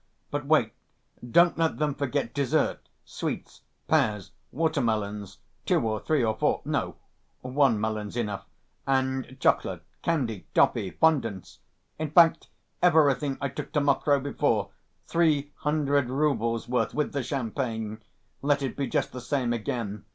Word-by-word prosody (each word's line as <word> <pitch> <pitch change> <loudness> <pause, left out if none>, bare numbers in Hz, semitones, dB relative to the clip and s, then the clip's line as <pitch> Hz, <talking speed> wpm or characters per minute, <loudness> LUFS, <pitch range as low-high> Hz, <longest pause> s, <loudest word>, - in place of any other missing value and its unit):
But - - -3
wait: - - +3 0.5
don't 170 +8 +4
let 165 -1 +1
them 150 -1 0
forget 140 -3 -2
dessert, 140 -3 0 0.2
sweets, - - -5 0.3
pears, 110 -11 +1 0.2
water‐melons, 110 - -1 0.3
two - - +4
or 110 -1 -1
three 150 0 +1
or 110 -1 +1
four—no, - - -1 0.5
one 130 -3 +2
melon's 110 0 -3
enough, 100 -4 -3 0.4
and 130 -1 0
chocolate, - - +1 0.2
candy, 125 - -1
toffee, 95 - +3
fondants; 115 - +1 0.4
in 155 -1 -2
fact, 165 +1 +5 0.3
everything 150 -5 +3
I 140 - -1
took 145 +2 -7
to 150 - +3
Mokroe 140 0 +2
before, 115 -8 0 0.3
three 155 -4 +1
hundred 145 -4 +1
roubles' 130 -5 0
worth 120 -3 0
with 150 - -1
the 140 - 0
champagne... 115 -4 -3 0.4
let 145 0 +1
it 135 - -3
be 140 -1 -2
just - - -1
the 125 - -7
same 125 -2 0
again. 105 -3 -4
135 Hz, 135 wpm, -27 LUFS, 110-145 Hz, 0.5 s, fact